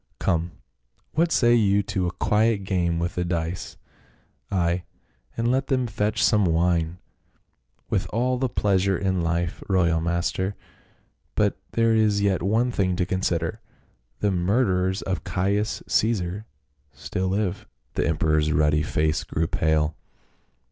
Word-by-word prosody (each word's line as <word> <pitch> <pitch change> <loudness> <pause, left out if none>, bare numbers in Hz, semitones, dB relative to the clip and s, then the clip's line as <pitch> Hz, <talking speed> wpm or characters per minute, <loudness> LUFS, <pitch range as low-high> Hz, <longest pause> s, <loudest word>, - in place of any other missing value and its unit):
Come, 85 -2 0 0.6
what 165 +2 +1
say 120 -4 +4
you 100 -3 +3
to 95 -2 -1
a - - -2
quiet 110 -1 +1
game 90 -3 0
with 85 +1 -2
the 90 - -1
dice? 85 0 -3 0.7
Ay, 90 -1 +1 0.6
and 115 +1 +1
let 135 +1 0
them 130 -3 +1
fetch 105 -2 -1
some 105 -1 +4
wine." 85 -1 +1 0.5
" - - -45
With - - 0
all 125 +3 0
the 130 -1 0
pleasure 95 -3 +1
in 95 -1 0
life, 85 +1 -1
royal 85 -4 +2
master. 85 +3 -1 0.8
But - - +1
there 115 0 +3
is 110 -2 +3
yet 100 -2 +1
one 110 +7 +1
thing 95 -5 0
to 90 - 0
consider. 85 -3 -1 0.6
The 105 - +2
murderers 95 0 +1
of 95 -1 -3
Caius 100 +4 -1
Caesar 105 -1 0 0.4
still 90 +6 -3
live." 100 0 -2 0.3
The - - 0
emperor's 75 -1 +1
ruddy 75 0 +3
face 75 0 0
grew 80 - -1
pale. 80 -1 +1
95 Hz, 140 wpm, -24 LUFS, 85-105 Hz, 0.8 s, say